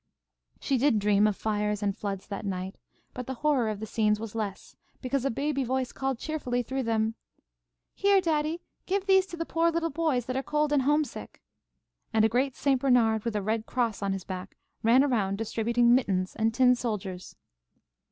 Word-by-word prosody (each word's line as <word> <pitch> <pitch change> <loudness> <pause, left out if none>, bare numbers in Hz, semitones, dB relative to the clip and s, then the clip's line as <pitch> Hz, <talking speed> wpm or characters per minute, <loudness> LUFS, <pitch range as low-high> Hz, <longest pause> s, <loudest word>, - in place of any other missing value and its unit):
She 270 -2 0
did 275 -3 +3
dream 205 0 +3
of 210 - 0
fires 210 -1 -1
and 200 -1 0
floods 200 -3 -4
that 200 -1 -6
night, 190 -1 -4 0.3
but 250 -1 -6
the 265 - -4
horror 270 -4 +1
of 210 -2 -4
the 220 - -4
scenes 210 -1 +1
was 225 -1 -6
less, 210 -4 -5 0.2
because 265 0 -2
a - - +2
baby 275 +2 -1
voice 260 0 -1
called 270 -2 -2
cheerfully 250 -4 -2
through 265 +3 -3
them, 225 -2 0 0.8
"Here, 400 0 +4
daddy, 320 -1 0 0.3
give 390 +1 0
these 385 -1 +4
to 345 - -8
the 330 - -2
poor 330 +1 +2
little 330 0 -1
boys 290 -6 0
that 255 - -4
are 265 - 0
cold 300 +1 0
and 285 - +4
homesick?" 295 +2 -1 0.7
and 220 -1 +4
a - - +3
great 255 +3 0
St. 270 -3 +1
Bernard, 230 -5 +3
with 230 -2 -2
a 205 - -1
Red 220 +2 -1
Cross 235 -5 -1
on 200 -1 0
his 195 -1 -5
back, 185 0 -7 0.2
ran 240 +4 +5
around 210 -8 0
distributing 235 +2 +2
mittens 190 -7 +1
and 225 0 +1
tin 250 +2 +5
soldiers. 200 -7 -4
240 Hz, 190 wpm, -28 LUFS, 210-275 Hz, 0.8 s, ran